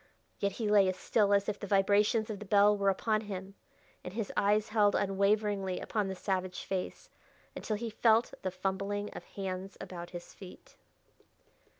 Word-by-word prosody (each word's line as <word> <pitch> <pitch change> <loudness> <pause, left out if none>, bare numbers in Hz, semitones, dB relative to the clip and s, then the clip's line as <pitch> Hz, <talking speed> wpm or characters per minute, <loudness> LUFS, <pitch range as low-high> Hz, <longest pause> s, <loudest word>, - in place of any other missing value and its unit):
Yet 200 -1 0
he 220 +1 -3
lay 205 -2 +5
as 185 - -3
still 205 +1 +2
as 200 0 +3
if 205 -1 -2
the 200 - -6
vibrations 205 +3 +3
of 205 - -6
the 210 - -8
bell 205 +1 +5
were 200 -1 +2
upon 215 +3 +1
him, 195 -2 -7 0.5
and 180 - -8
his 225 -3 -3
eyes 210 +1 +2
held 210 -2 +3
unwaveringly 200 -1 +1
upon 210 -3 -1
the 190 - -4
savage 185 -1 -2
face, 185 -2 -4 0.4
until 215 - -3
he 225 +1 -4
felt 225 +1 +3
the 190 - -1
fumbling 195 +2 -3
of - - -8
hands 190 0 -6
about 175 -1 -7
his 175 -1 -9
feet.... 185 -2 -13
200 Hz, 175 wpm, -31 LUFS, 190-210 Hz, 0.5 s, lay